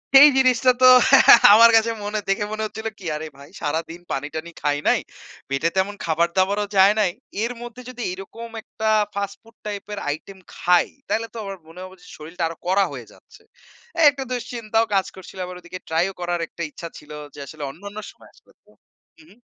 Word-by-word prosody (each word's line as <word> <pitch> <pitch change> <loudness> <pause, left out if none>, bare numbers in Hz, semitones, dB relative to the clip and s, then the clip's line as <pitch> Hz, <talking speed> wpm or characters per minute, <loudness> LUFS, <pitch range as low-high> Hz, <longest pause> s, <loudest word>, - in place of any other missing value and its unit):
সেই 290 +2 +11
জিনিসটা 255 0 +4
তো 255 - +8 0.7
আমার 230 +2 +8
কাছে 225 +1 +2
মনে, 210 +1 -2
দেখে 195 +1 +1
মনে 215 0 -3
হচ্ছিল 220 +1 -6
কি? 190 - -12
"আরে 155 +1 -5
ভাই, 140 +1 -14
সারাদিন 165 +3 -3
পানি 135 +2 -2
টানি 160 +2 -6
খাই 145 -1 +1
নাই, - - +4 0.5
পেটে 135 +5 0
তেমন 195 +2 0
খাবার 165 +1 +1
দাবারও 200 +2 +2
যায় 195 +2 +7
নাই, 200 -4 +2 0.3
এর 235 - -1
মধ্যে 240 +1 -9
যদি 250 -1 -9
এরকম 210 +5 -9
একটা, 220 0 -3 0.3
ফাস্ট 200 0 -3
ফুড 230 0 -21
টাইপ 205 -1 -5
এর 205 - -4
আইটেম 175 +6 -6 0.2
খাই? 180 0 +3 0.2
তাইলে 230 +1 -1
তো 235 - -9
আমার 195 -1 -6
মনে 165 +2 -13
হবে 185 0 -11
যে, 180 - -17
শরীলটা 165 +3 -6
আরো 165 - -7
কড়া 195 +2 +3
হয়ে - - -8
যাচ্ছে।" - - -20 0.7
একটা 275 -1 -5
দুশ্চিন্তাও 230 -2 -1
কাজ 190 -1 +2
করছিলো, 190 0 -10
আবার 180 0 -8
ওদিকে 175 +1 -9
ট্রাই 160 +2 +2
করার 175 0 -2
একটা 170 - -11
ইচ্ছা 170 - -8
ছিল 150 - -14 0.2
যে, - - -12
আসলে 155 0 -9
অন্যান্য 200 +7 -11
সময় - - -19
আসলে - - -25
তো - - -28 0.5
হু, 325 - -18
হুম। 230 - -21
195 Hz, 195 wpm, -22 LUFS, 170-220 Hz, 0.7 s, সেই